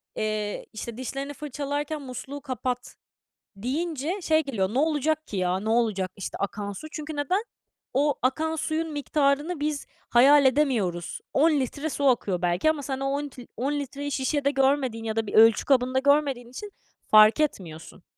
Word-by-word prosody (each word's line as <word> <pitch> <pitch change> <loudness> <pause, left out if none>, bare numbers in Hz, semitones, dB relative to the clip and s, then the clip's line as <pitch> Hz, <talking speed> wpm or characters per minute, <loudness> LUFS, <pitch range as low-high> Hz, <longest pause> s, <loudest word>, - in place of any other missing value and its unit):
eee, 215 -1 -2
işte, 220 +1 -6
"Dişlerini 275 +3 -5
fırçalarken 290 +1 -4
musluğu 270 +2 -7
kapat." 255 -2 -4 0.6
deyince 310 - -2
şey 315 -1 +3
geliyor, 210 -6 -2
ne - - +1
olacak 310 +1 +1
ki, 205 - -6
ya, 185 0 0
ne 215 - -4
olacak, 220 -5 +1
işte, 195 - -6
akan 200 0 -3
su? 255 +10 -8
Çünkü 305 0 -6
neden? 365 - 0 0.5
O 285 +2 +2
akan 320 +5 0
suyun 315 +1 -2
miktarını 290 +2 0
biz 295 -1 -2 0.2
hayal 280 +4 +6
edemiyoruz. 230 - 0
10 315 +4 +4
litre 280 +4 -3
su 285 - -3
akıyor 200 -8 +1
belki 175 - +2
ama 305 -2 -2
sen 270 -1 -4
o 275 - -1
10 285 +2 -1
lit 255 -3 -10
10 270 +5 -1
litreyi 285 0 -4
şişede 280 +1 0
görmediğin 265 -4 +1
ya 220 -1 -3
da 225 -1 0
bir - - -6
ölçü 225 0 +6
kabında 260 -1 +2
görmediğin 275 -3 +2
için 405 +12 -8 0.3
fark 215 +5 +7
etmiyorsun. 175 - -3
270 Hz, 165 wpm, -26 LUFS, 225-295 Hz, 0.6 s, fark